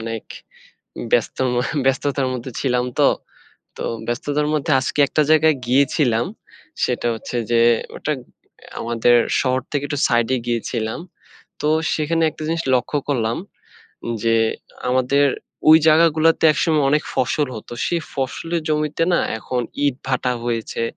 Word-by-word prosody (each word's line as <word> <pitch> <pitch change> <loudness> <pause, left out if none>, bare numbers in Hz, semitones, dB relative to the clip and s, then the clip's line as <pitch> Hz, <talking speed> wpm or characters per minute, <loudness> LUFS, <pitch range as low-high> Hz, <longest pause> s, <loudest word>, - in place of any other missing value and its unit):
অনেক 115 -1 -5 0.9
ব্যস্ত 120 -2 +2 0.2
মা 120 - +1 0.2
ব্যস্ততার 135 0 +1
মধ্যে 125 +1 -5
ছিলাম 125 -2 +1
তো। - - +6 0.7
তো - - -5 0.2
ব্যস্ততার 145 +5 -1
মধ্যে 150 +1 0
আজকে 130 +3 -3
একটা 155 - +1
জায়গায় 155 -1 +5
গিয়েছিলাম। 125 -3 +2 0.6
সেটা - - 0
হচ্ছে 115 +2 -5
যে, 115 0 +4 0.3
ওটা 155 - -3 0.7
আমাদের 120 +1 +2 0.2
শহর 130 -1 +1
থেকে 145 -2 -1
একটু 145 -2 -3
side-এ 120 +2 +1
গিয়েছিলাম। 115 +1 -2 0.6
তো 150 - 0 0.3
সেখানে 165 +1 0
একটা 155 - -13
জিনিস 165 +1 -1
লক্ষ্য 125 +4 -1
করলাম 115 -5 0 0.9
যে, 115 0 +3 0.5
আমাদের 130 +3 +3 0.4
ওই 160 - +10
জায়গাগুলোতে 160 0 +4
একসময় 155 -1 +1
অনেক 150 +1 +2
ফসল 145 +4 +1
হতো। 110 - -10
সেই 170 -1 0
ফসলের 165 +5 -2
জমিতে 150 +1 0
না, - - +4 0.2
এখন 125 +2 -3 0.3
ইটভাটা 130 -1 -1
হয়েছে। 115 -1 -2
135 Hz, 130 wpm, -20 LUFS, 120-150 Hz, 0.9 s, ওই